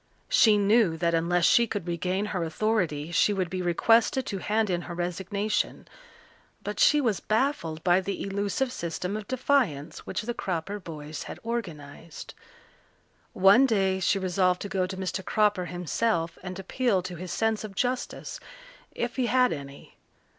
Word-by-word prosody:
She 215 -2 +5
knew 205 -4 +3
that 170 0 0
unless 170 +1 +2
she 235 0 +5
could 205 -5 -4
regain 180 +4 -1
her 180 -3 -1
authority 165 -4 -1
she 205 +5 +3
would 185 -3 -2
be 185 -1 -2
requested 225 +8 +3
to 195 - -4
hand 215 +1 0
in 175 -1 0
her 175 - -5
resignation, 190 +4 -2 0.8
but - - -5
she 405 -12 +5
was 230 -8 +1
baffled 215 - -1
by 180 +1 +4
the 195 +1 -4
elusive 200 +6 -1
system 180 -1 -4
of 215 -1 -6
defiance 240 - 0
which 190 - -4
the 240 +2 -3
Cropper 190 -1 -3
boys 155 -4 -8
had - - -7
organized. 165 -9 -6 1.0
One 200 +8 +6
day 195 -5 +1
she 190 +2 +2
resolved 185 -1 +1
to 200 - -5
go 190 -2 0
to 190 0 -6
Mr. 190 0 -3
Cropper 205 -3 +1
himself 175 0 -1
and 185 0 -6
appeal 195 0 0
to 180 -1 -6
his 180 +1 -6
sense 220 +2 0
of 205 -2 -8
justice, 250 +3 -3 0.6
if 240 +2 -3
he 255 -2 +1
had 250 +1 +3
any. 140 -2 -10
190 Hz, 160 wpm, -27 LUFS, 175-220 Hz, 1.0 s, One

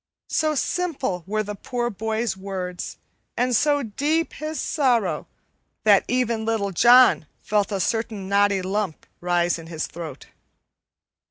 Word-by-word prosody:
So 310 -1 +1
simple 275 - -1
were 215 +2 0
the 210 0 -5
poor 240 +4 -3
boy's 220 +2 -2
words, 190 -2 -5 0.4
and 250 0 +2
so 290 +3 +3
deep 295 +9 -1
his 310 +1 -5
sorrow, 235 - +1 0.6
that 205 -2 +6
even 235 -3 0
Little 220 -3 -1
John 240 - +6 0.2
felt 210 -1 +1
a 200 - -1
certain 215 0 -2
knotty 200 -1 +2
lump 190 -3 -2
rise 175 -1 +1
in 165 - -10
his 160 -2 -3
throat. 170 -2 -8
215 Hz, 135 wpm, -23 LUFS, 190-250 Hz, 0.6 s, that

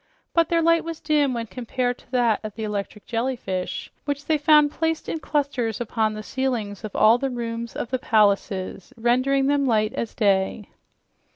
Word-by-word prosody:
But 335 -1 +3
their 335 -1 +2
light 335 0 +4
was 330 -1 -6
dim 295 -4 +1
when 230 -1 -3
compared 245 +3 -3
to - - -22
that 240 -4 +2
of 215 -1 -6
the 225 - -5
electric 210 0 -4
jellyfish, 230 -6 -3
which 285 0 -3
they 310 -2 +1
found 300 -1 +5
placed 325 0 -1
in 325 - -2
clusters 275 -8 -1
upon 220 -2 0
the 215 - -6
ceilings 230 -6 -2
of 215 - -7
all 225 +3 +5
the 270 +1 -1
rooms 235 -1 -4
of 240 - -4
the 255 - 0
palaces, 200 -5 +1
rendering 255 +4 +2
them 280 0 +2
light 215 -2 +2
as 230 - -4
day. 200 -1 +1
240 Hz, 180 wpm, -24 LUFS, 215-285 Hz, -, found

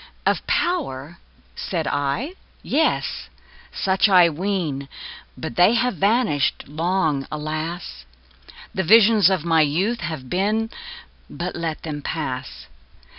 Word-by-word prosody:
Of - - +1
power! 170 - -1 0.4
said 165 -4 -3
I? 145 - -1 0.3
Yes! 140 - 0 0.4
such 195 +2 +2
I 180 -3 +7
ween 160 -6 -2 0.5
But - - -6
they 185 +6 +6
have 245 -4 +1
vanished 205 - +1
long, 155 -2 0
alas! 155 - -5 0.7
The 190 - 0
visions 215 +2 +6
of 185 -4 -1
my 165 -1 +4
youth 180 +11 +1
have 160 -6 -5
been 215 - 0 0.6
But 175 +1 -5
let 165 -2 -4
them 150 -2 -5
pass. 125 - -5
170 Hz, 115 wpm, -22 LUFS, 145-195 Hz, 0.7 s, I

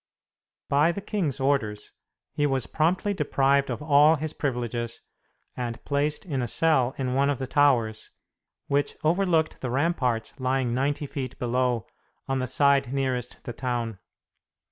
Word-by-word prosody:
By 145 +4 +3
the 170 - -5
king's 190 - -2
orders, 115 -7 0 0.4
he 145 -1 +1
was 135 -3 0
promptly 180 +6 +1
deprived 140 -4 +2
of - - -4
all 150 +1 +6
his 155 0 -4
privileges 120 -3 -3 0.6
and 120 -2 -5
placed 145 +3 -1
in 140 -7 -2
a 120 - -1
cell 135 -2 +2
in 130 -2 -1
one 140 +2 +2
of 145 - 0
the 130 - -3
towers, 125 -6 +2 0.6
which 140 +1 0
overlooked 165 -1 +1
the 125 - -2
ramparts 130 -4 0
lying 130 -2 0
ninety 140 +3 0
feet 130 -2 -5
below, 125 -1 0 0.4
on 135 0 0
the 130 - -1
side 140 -1 +3
nearest 130 -3 -2
the 120 - -6
town. 120 -4 -3
135 Hz, 145 wpm, -26 LUFS, 125-145 Hz, 0.6 s, all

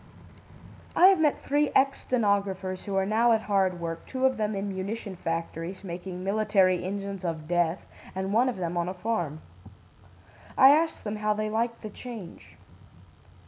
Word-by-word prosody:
"I 370 - +8
have 385 -3 +4
met 300 -2 +1
three 290 +1 +2
ex 275 +1 +3
stenographers 200 -5 -1
who 195 -1 0
now 225 +4 +3
are 230 - +6
at 220 - -1
hard 190 -3 +1
work, 165 -1 -5
two 260 0 -1
of 260 -1 +2
them 215 -1 -1
in 195 +1 -3
munition 195 +1 -5
factories 165 +2 -4
(making 180 0 -6
military 195 -3 +2
engines 195 0 -4
of 160 -3 -4
death) 175 0 0 0.3
and 190 +1 -2
one 245 +4 +4
of 245 - -4
them 175 -1 -3
on 170 +1 0
a 185 - -5
farm. 180 -7 -2 1.2
I 265 - +9
asked 320 +2 +2
them 210 0 -3
how 210 0 0
they 215 0 -2
liked 230 +2 -1
the 215 - -6
change. 225 -6 -10
200 Hz, 170 wpm, -27 LUFS, 180-225 Hz, 1.2 s, I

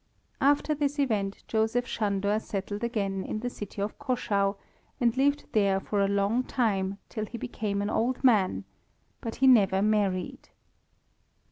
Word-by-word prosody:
After 285 +2 +3
this 290 0 -1
event 210 -8 -1
Joseph 225 +2 +1
Sándor 205 -2 0
settled 205 +2 -4
again 200 -5 -1
in 215 - -4
the 245 +1 -3
city 205 -2 -5
of 210 - -5
Caschau, 210 -7 0 0.4
and 235 -2 +2
lived 285 +2 +2
there 200 -3 +3
for 200 +1 -1
a 195 - +3
long 200 +4 +1
time 200 -7 0
till 215 -2 -4
he 235 - -7
became 210 -4 -3
an 205 - -1
old 250 +4 0
man, 215 -8 +3 0.6
but 230 -2 -5
he 270 - +1
never 205 -7 +5
married. 205 -4 0
215 Hz, 150 wpm, -28 LUFS, 200-245 Hz, 0.6 s, never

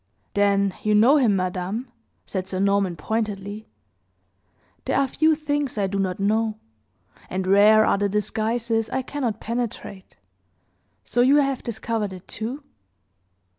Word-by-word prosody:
"Then 200 -1 +2
you 215 0 +2
know 240 +8 +6
him, 235 -8 +3
madame?" 185 +6 -3 0.3
said 190 0 -4
Sir 185 - -4
Norman, 200 -2 +1
pointedly. 210 +3 -4 1.2
"There - - 0
are 275 - +3
few 310 +4 +2
things 290 -4 -2
I 200 - +1
do 195 +1 -2
not 185 -1 -1
know, 215 +2 +1 0.7
and 185 0 -2
rare 210 +3 +6
are - - +2
the 205 0 +1
disguises 225 +2 -1
I 260 - -2
cannot 250 -6 -3
penetrate. 230 -4 -5 0.9
So 240 - +1
you 265 +3 +5
have 275 -3 +2
discovered 220 -3 -3
it, 185 0 -12
too?" 245 +7 -5
215 Hz, 135 wpm, -23 LUFS, 200-240 Hz, 1.2 s, know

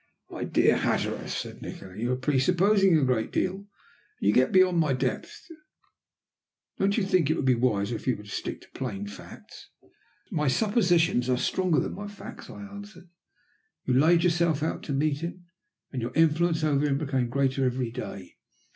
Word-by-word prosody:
"My - - -4
dear - - +3
Hatteras," - - -1
said - - -5
Nikola, 95 -1 -9
"you 120 +4 -2
are - - +2
presupposing 170 +8 +3
a 150 - +1
great 125 -4 0
deal. 185 - 0
And 200 +1 -14 0.5
you 100 - +2
get 130 +3 +3
beyond 185 -2 +4
my 150 -4 +2
depth. 130 - -3 1.3
Don't 200 +2 +2
you 220 - +2
think 185 -6 +2
it 160 - +2
would 140 - -2
be 130 - +5
wiser 115 -2 0
if - - -12
you 125 - +2
were 105 - -11
to - - -15
stick - - -5
to - - -19
plain 100 -6 -5
facts?" 100 - -12 0.6
"My 150 -2 0
suppositions 175 - +2
are 125 - +2
stronger 180 +3 +1
than - - -2
my 205 +1 -6
facts," 205 0 -10
I 205 - -9
answered. 200 -3 -11 0.7
"You 130 - 0
laid 165 +6 +4
yourself 170 -3 +2
out 160 - -2
to - - -4
meet 145 +1 0
him, 175 +2 -6 0.5
and 130 - -4
your 115 - -5
influence 165 +1 +2
over 145 -2 +2
him 140 -2 +1
became 135 -5 -1
greater 135 +1 0
every 125 -2 -1
day. 100 -6 -8
150 Hz, 180 wpm, -27 LUFS, 125-175 Hz, 1.3 s, be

